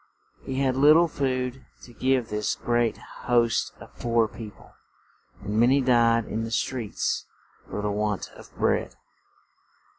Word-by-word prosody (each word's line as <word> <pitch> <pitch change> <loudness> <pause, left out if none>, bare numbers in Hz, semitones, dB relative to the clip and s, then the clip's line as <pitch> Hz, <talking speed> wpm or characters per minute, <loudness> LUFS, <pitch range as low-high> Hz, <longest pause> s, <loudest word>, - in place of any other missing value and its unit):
He 135 - -5
had 130 -2 +1
lit 145 +3 +7
tle 170 +1 +5
food 130 -3 -2 0.2
to 120 - -13
give 130 +1 0
this 105 0 -1
great 120 -2 0 0.3
host 120 -2 +2
of - - -14
poor 115 -1 +2
peo 110 0 -9
ple, - - -19 0.7
and 105 +2 -1
ma 120 - +5
ny 135 +2 +4
died 115 -3 +3
in 110 +1 -3
the 115 - -4
streets 115 -1 -2 0.4
for 105 - -4
the 105 - 0
want 105 -1 -2
of - - -15
bread. - - 0
120 Hz, 155 wpm, -26 LUFS, 110-130 Hz, 0.7 s, lit